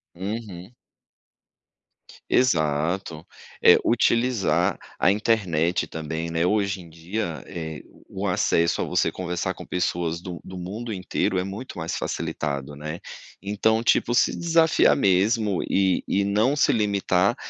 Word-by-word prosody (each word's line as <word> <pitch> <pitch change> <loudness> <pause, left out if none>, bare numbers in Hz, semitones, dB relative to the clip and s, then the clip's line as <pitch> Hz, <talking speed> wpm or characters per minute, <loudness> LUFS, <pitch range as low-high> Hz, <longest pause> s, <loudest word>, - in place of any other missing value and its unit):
Uhum. 95 0 -6 1.6
Exato. 80 - +1 0.4
É, - - +8
utilizar 120 -2 +2 0.2
a - - +4
internet 90 -7 +1
também, 80 +1 -4
né, 80 +1 0
hoje 100 -1 +1
em 85 - -11
dia, 85 +2 -5
eh, 80 -3 -6 0.3
o - - -4
acesso 85 0 +1
a - - +1
você - - +1
conversar 90 0 -3
com - - -10
pessoas 85 -2 -2
do 90 -2 -7
do 95 - -10
mundo 105 +6 -5
inteiro 95 0 -1
é - - -1
muito 100 +7 -7
mais 80 0 -3
facilitado, 75 -3 -3
né, 75 +3 -6 0.4
então, 110 +3 +1
tipo, 120 - +2
se 120 - +3
desafiar 165 -1 +4
mesmo 100 -1 +2
e 95 -1 +2
e 100 - +1
não 105 +7 +2
se 145 - +3
limitar 100 0 +1
95 Hz, 130 wpm, -24 LUFS, 85-110 Hz, 1.6 s, É